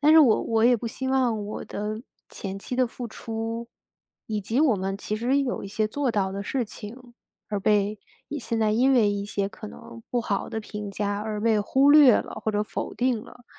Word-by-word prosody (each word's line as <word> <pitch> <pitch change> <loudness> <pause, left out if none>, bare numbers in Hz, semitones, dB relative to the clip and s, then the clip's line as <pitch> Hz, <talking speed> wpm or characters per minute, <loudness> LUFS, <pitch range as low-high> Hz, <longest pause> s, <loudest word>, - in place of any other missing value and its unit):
但 300 +2 +6
是 320 - +9
我 260 -8 +6
我 225 -1 +1
也 245 0 +6
不 235 - -5
希 260 +3 -4
望 250 -5 +1
我 210 - -5
的 215 +2 -4 0.3
前 195 -1 -6
期 245 +5 -5
的 255 -1 +3
付 240 0 -7
出， 225 +1 -5 0.6
以 215 -1 -2
及 225 +6 0
我 275 -8 +4
们 195 +1 -2
其 210 +1 -3
实 250 +5 +2
有 265 -3 -2
一 - - -6
些 215 +2 0
做 275 +3 0
到 200 -4 0
的 200 +1 -4
事 245 +3 -1
情， 240 +4 -10 0.3
而 205 - -1
被 210 +1 +2 0.3
一 295 - -4
现 230 -3 -2
在 215 -1 +3
因 255 +5 +4
为 225 -5 +4
一 200 0 -2
些 200 -1 -2
可 215 +1 -10
能 230 - -11
不 245 - +1
好 205 -4 -2
的 220 - -3
评 210 -1 -6
价， 200 0 -2
而 215 -1 -3
被 220 0 +3
忽 265 +7 +4
略 290 -5 +8
了 - - -5
或 220 - +1
者 210 0 +1
否 - - -4
定 250 -1 +1
了。 245 - -15
225 Hz, 245 characters per minute, -26 LUFS, 210-245 Hz, 0.6 s, 是